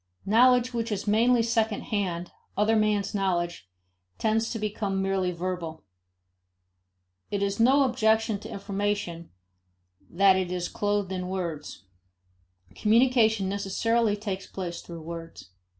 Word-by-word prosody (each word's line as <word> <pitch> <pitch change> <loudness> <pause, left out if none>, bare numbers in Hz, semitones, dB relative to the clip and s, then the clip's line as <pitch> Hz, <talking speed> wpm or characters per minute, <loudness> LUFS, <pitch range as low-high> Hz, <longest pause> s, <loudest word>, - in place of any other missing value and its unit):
Knowledge 250 +3 +4
which 230 -1 -2
is 205 - -2
mainly 230 +3 +3
second 225 -2 0
hand, 180 -5 -3 0.3
other 210 +2 +3
men's 210 -2 +1
knowledge, 175 - -1 0.5
tends 220 +1 +1
to 230 - -3
become 210 -2 -2
merely 190 -1 0
verbal. 170 -2 -4 1.5
It 200 -1 -1
is 200 +2 -1
no 265 +5 +5
objection 220 -3 +2
to 220 - -9
information 200 -4 -3 0.8
that 195 +1 +5
it 185 -1 -2
is 180 -1 -2
clothed 205 -2 -1
in 185 -1 -3
words; 170 - -5 0.9
communication 220 - +3
necessarily 205 +3 +1
takes 200 -2 -5
place 175 -3 -5
through 170 -2 -9
words. 165 - -9
200 Hz, 120 wpm, -27 LUFS, 185-220 Hz, 1.5 s, no